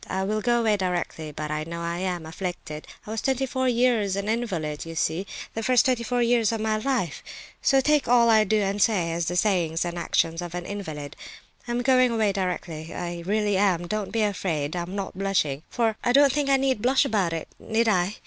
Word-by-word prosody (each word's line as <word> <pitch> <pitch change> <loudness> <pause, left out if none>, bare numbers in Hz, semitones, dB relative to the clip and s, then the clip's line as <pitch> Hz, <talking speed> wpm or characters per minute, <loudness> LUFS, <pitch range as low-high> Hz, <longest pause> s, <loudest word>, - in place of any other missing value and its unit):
I 190 - -2
will 215 +2 -1
go 240 +1 +2
away 215 -2 +2
directly; 175 -4 -3
but 150 +1 -5
I 150 0 -2
know 170 +1 -6
I 170 +1 -3
am 180 -3 -2
afflicted. 160 -2 -6 0.2
I 210 - -7
was 220 0 -2
twenty 265 0 0
four 260 0 -1
years 235 -5 +2
an 200 +1 -3
invalid, 180 -11 -2
you 165 0 -8
see—the 185 +7 -3
first 250 +1 +4
twenty 255 -2 +2
four 240 +1 0
years 235 -2 +3
of 225 - -2
my 215 0 0
life—so 260 - -1
take 300 0 +2
all 240 -1 +5
I 220 -1 +6
do 215 +1 +1
and 200 +1 -1
say 185 -7 +2
as 165 0 -2
the 175 - -1
sayings 175 -4 +1
and 175 0 -4
actions 165 0 0
of 175 0 -6
an 175 0 -4
invalid. 155 -8 -6 0.5
I'm 240 +1 -1
going 255 -1 +4
away 220 -3 +1
directly, 180 -4 -3
I 175 -1 -4
really 210 -1 +1
am—don't 190 +1 0
be 225 0 +1
afraid. 175 -7 -1
I 175 - -1
am 180 +3 -6
not 195 -2 -4
blushing, 185 -8 0
for 225 -3 0
I 245 - +2
don't 280 0 +6
think 290 -1 0
I 275 - +5
need 265 -5 0
blush 260 +4 +3
about 200 -9 +1
it, 165 -1 -4
need 225 +1 0
I? 190 -1 +2
200 Hz, 215 wpm, -25 LUFS, 170-235 Hz, 0.5 s, I